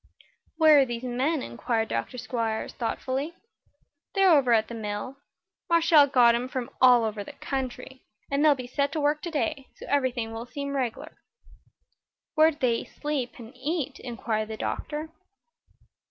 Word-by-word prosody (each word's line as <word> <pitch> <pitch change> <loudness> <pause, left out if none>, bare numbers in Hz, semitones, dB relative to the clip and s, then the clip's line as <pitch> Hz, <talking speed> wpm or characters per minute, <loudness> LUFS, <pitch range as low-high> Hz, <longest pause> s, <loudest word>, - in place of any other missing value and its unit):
"Where 310 -2 +7
are 275 - +5
these 240 -1 -5
men?" 260 +5 0
inquired 225 - -2
Dr. 115 - -3
Squiers, 230 -3 -3
thoughtfully. 265 +6 -3 0.8
"They're 390 -2 +5
over 275 -6 +4
at 220 -1 +4
the - - -8
mill. 220 +4 -5 0.5
Marshall 330 -3 +6
got 245 -3 +5
'em 240 +2 -1
from 255 0 -4
all 250 -2 +7
over 215 -2 -2
the - - -10
country, 260 -1 -5 0.3
and 280 +1 +2
they'll 300 -2 +6
be 255 -2 -7
set 280 +3 -1
to 315 - -1
work 295 +1 +1
today, 315 -4 -2
so - - -11
everything 255 -5 0
will 230 +2 -6
seem 280 +2 -5
reg'lar." 250 -4 -3 1.2
"Where 315 0 +6
do 310 - -7
they 235 -3 +1
sleep 290 -5 -4
and 230 0 -11
eat?" 290 +3 -3
inquired 225 -3 -3
the 220 0 -6
doctor. 305 +6 -4
255 Hz, 155 wpm, -27 LUFS, 235-295 Hz, 1.2 s, Where